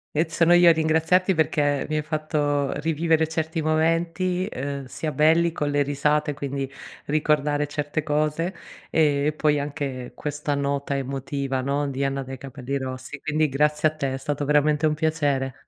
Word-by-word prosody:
Eh, 160 +2 +2
sono 165 +1 +4
io 175 0 +7
a - - +8
ringraziarti, 160 +3 +2
perché 145 -3 +1
mi 155 - -2
hai 155 - 0
fatto 150 -2 -1
rivivere 160 0 +1
certi 160 0 -2
momenti, 165 +4 +1
uhm, 140 0 -4
sia 155 +3 -4
belli 165 +3 +3
con 150 -3 -2
le 145 0 +2
risate 150 +1 0
quindi 140 -1 -4 0.4
ricordare 150 -1 +1
certe 145 +1 -2
cose, 155 +4 0 0.4
ehm, 145 -3 +2
e 150 - +2
poi 150 -1 +1
anche 140 -4 -4
questa 145 0 -3
nota 140 0 -1
emotiva, 135 0 -3
no, 140 +2 -1
di 135 0 -3
Anna 135 -1 -1
dei 130 0 -7
capelli 135 +1 -5
rossi. 130 +1 -5
Quindi 155 0 +1
grazie 150 +3 +2
a 155 - -6
te, 135 -3 -2
è - - -1
stato 145 +1 -3
veramente 150 +1 +2
un 150 - +2
piacere. 145 -4 0
150 Hz, 170 wpm, -24 LUFS, 140-155 Hz, 0.4 s, a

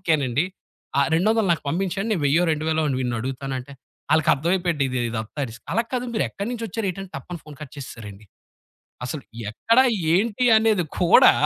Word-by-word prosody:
ఓకేనండి. 150 -5 +1 0.5
ఆ - - +6
200 215 +4 +2
నాకు 165 - -2
పంపిచండి. 195 +6 -1
నేను 175 - -1
వెయ్యో 155 +5 +3
రెండు 155 0 -2
వేలో 160 0 +1 0.2
వీడిని 125 -2 -1
అడుగుతానంటే 130 +1 -4 0.4
ఆళ్ళకర్థమైపోయిండి 165 +1 +2 0.3
ఇదంత 110 +4 -5
రిస్క్ 115 +2 -12
అలా 230 - +2
కాదు 250 -1 -1
మీరెక్కడినుంచొచ్చారేంటంటే 205 -4 -3
తప్పని 170 +6 -7
ఫోను 150 -2 -11
కట్ 150 -4 -9
చేసేసారండి. 110 -6 -9 0.8
అసలు 135 +3 -4 0.3
ఎక్కడ? 225 - +1 0.3
ఏంటి? 215 +6 +2
అనేది 220 -5 +3 0.2
కూడా 175 -2 +7
165 Hz, 135 wpm, -23 LUFS, 135-195 Hz, 0.8 s, కూడా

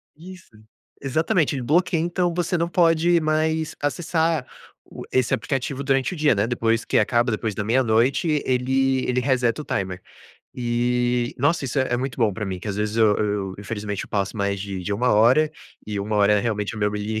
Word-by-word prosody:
Isso. 180 +3 -13 0.5
Exatamente. 155 +2 +1
Ele 130 - -3
bloqueia, 165 +4 +2
então, 175 +1 0
você 175 +1 -1
não 170 0 0
pode 170 0 +3
mais 155 0 0
acessar 160 0 0 0.4
o - - -10
esse 130 -2 +1
aplicativo 135 +3 -2
durante 135 +4 +1
o - - -5
dia, 150 -3 +3
né, 105 +1 0
depois 115 -1 0
que - - +1
acaba, 120 +3 +2
depois 110 -1 -2
da 105 - -4
meia-noite, 130 +6 +2
ele 130 +1 +1
ele 125 0 0
reseta 125 0 +1
o - - -11
timer. 95 -1 -3 0.5
E, 120 +1 0
nossa, 165 -3 +1
isso 135 +1 -2
é 130 -2 0
é - - +2
muito 130 +1 -4
bom 110 -4 +2
pra 105 +2 -4
mim, 95 -2 -4
que 90 - -10
às 100 - -2
vezes 105 +1 -2
eu 110 -2 +4
eu 100 -3 -2
infelizmente 105 -1 -4
eu - - -16
passo 100 0 -2
mais 100 -1 -1
de 95 -2 -5
de 100 - -3
1 125 +5 +1
hora 125 +9 +4 0.4
e 105 -1 -3
1 105 +2 -2
hora 105 0 +4
é 105 - +3
realmente 105 -2 -2
é - - -9
o - - -6
meu 105 0 +2
li 105 +1 -3
125 Hz, 205 wpm, -23 LUFS, 105-150 Hz, 0.5 s, eu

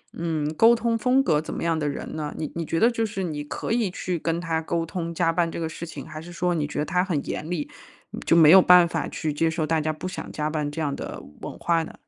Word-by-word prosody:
嗯， 160 -2 -2
沟 225 +8 +6
通 235 0 0
风 250 +4 +3
格 150 - +2
怎 - - -7
么 - - -4
样 165 -1 +1
的 150 - 0
人 140 - -6
呢？ 150 -2 -3
你 155 - -4
你 170 - -2
觉 165 +1 -1
得 235 +2 +5
就 230 -1 -1
是 195 -2 -4
你 150 -4 -3
可 145 - -5
以 230 -3 +1
去 180 -1 -3
跟 165 +1 -1
他 165 -2 -1
沟 165 +1 -1
通 170 0 -4
加 165 0 +2
班 170 -1 +1
这 - - -5
个 165 - -1
事 165 +1 -7
情？ 140 -4 -8
还 155 0 -8
是 175 +2 -10
说 175 +1 0
你 150 -3 -1
觉 150 - -7
得 150 - 0
他 180 0 +1
很 165 -7 -1
严 155 - -4
厉， 165 -5 -3 0.6
就 165 - +4
没 160 -2 +7
有 190 - +10
办 180 -1 +7
法 160 -3 -2
去 155 - -3
接 165 +2 +1
受 160 -1 -1
大 160 -1 +2
家 155 +1 -1
不 170 +4 -6
想 185 - -6
加 150 0 -2
班 150 -1 -2
这 160 +2 -4
样 145 -2 -1
的 - - -6 0.2
文 - - -6
化 165 -1 +1
呢？ - - -9
165 Hz, 305 characters per minute, -25 LUFS, 155-180 Hz, 0.6 s, 有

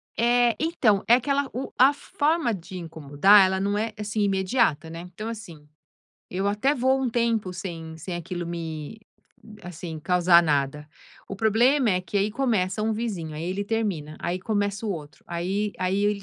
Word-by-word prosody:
Eh, 240 0 +3
então, 250 - +2
é 235 - +7
aquela 275 +2 0
o 255 +3 -4
a 265 +3 +6
forma 295 -2 0
de 185 -1 -8
incomodar, 165 +4 +4
ela 190 0 0
não 200 +1 0
é, 220 +1 -2
assim 210 +1 -2
imediata, 190 - +1
né. 165 +1 -7
Então, 215 +5 -5
assim, 175 -10 -9 0.6
eu 190 +2 -2
até 210 +8 +1
vou 260 0 +2
um 260 - 0
tempo 230 -5 0
sem 165 -3 -7
sem 175 +3 -6
aquilo 175 0 -5
me 165 +2 -6 0.6
assim, 170 -2 -7
causar 175 0 +5
nada. 150 -1 0 0.4
O 195 - -5
problema 235 +5 +3
é 180 -1 +1
que 185 +2 -5
aí 200 +2 +1
começa 215 -5 0
um 220 +1 +1
vizinho 200 -9 -4
aí 155 +2 -5
ele 190 +3 -2
termina, 200 -9 -2
aí 175 +2 -2
começa 205 +1 -2
o 215 - -1
outro. 150 -6 -7
Aí 190 +5 -2
aí 190 +2 0
ele 205 -1 0
195 Hz, 175 wpm, -25 LUFS, 170-225 Hz, 0.6 s, é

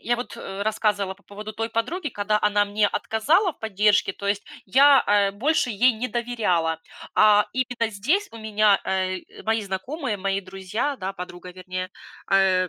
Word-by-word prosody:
я 240 - +1
вот 245 - -6
рассказывала 200 0 -1
по 200 - -27
поводу 210 +1 -8
той 225 +1 -3
подруги, 300 +9 -2
когда 210 -1 0
она 205 0 +3
мне 205 +1 +1
отказала 315 - +2
в - - -33
поддержке. 210 -2 +2
То 200 - -7
есть 200 0 0 0.2
я, 275 +6 +6
э, 200 -1 +3
больше 265 +5 +1
ей 240 +4 +4
не 235 +3 -4
доверяла, 185 -10 0 0.3
а 210 -1 +6
именно 245 -3 -1
здесь 305 - 0
у 230 - -9
меня, 215 -2 +3
э, 185 -1 -3
мои 225 0 +1
знакомые, 215 - -4
мои 195 0 -1
друзья, 195 +9 -3
да, 190 -2 -4
подруга, 180 -1 -9
вернее, 185 0 -5 0.4
э, 185 -2 +4
210 Hz, 165 wpm, -24 LUFS, 195-235 Hz, 0.4 s, я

